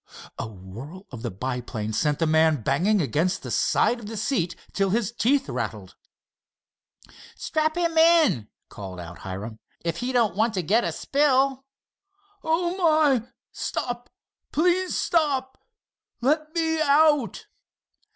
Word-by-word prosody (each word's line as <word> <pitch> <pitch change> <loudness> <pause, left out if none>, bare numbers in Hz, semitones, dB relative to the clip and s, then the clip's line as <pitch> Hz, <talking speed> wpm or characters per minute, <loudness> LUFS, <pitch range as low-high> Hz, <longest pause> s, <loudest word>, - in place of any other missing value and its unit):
A 115 - -3
whirl 110 - -10
of 120 -4 -8
the 120 - -3
biplane 115 0 -4
sent 150 +5 +1
the 165 - +1
man 160 -4 +3
banging 200 - +2
against 155 - 0
the - - -6
side 240 - +2
of 215 - -9
the 220 0 -6
seat 190 -7 -1 0.2
till 195 -1 +1
his 215 +1 0
teeth 265 +4 +1
rattled. - - -5 1.4
"Strap 310 +1 -1
him 335 -2 0
in," 320 - +4 0.2
called 95 -3 -9
out 90 0 -9
Hiram, 100 +4 -7 0.3
"if 170 0 -1
he 245 +6 -2
don't 230 -7 +2
want 220 +1 +1
to 185 - -1
get 215 +9 +2
a - - -1
spill." 270 -2 +1 0.8
"Oh, 345 +2 0
my! 310 - +3 0.2
Stop! 245 0 -4 0.4
Please 360 +3 +1
stop! 280 -6 0 0.6
Let 305 +5 +1
me 320 -1 +1
out!" 295 -3 +3
235 Hz, 135 wpm, -25 LUFS, -, 1.4 s, in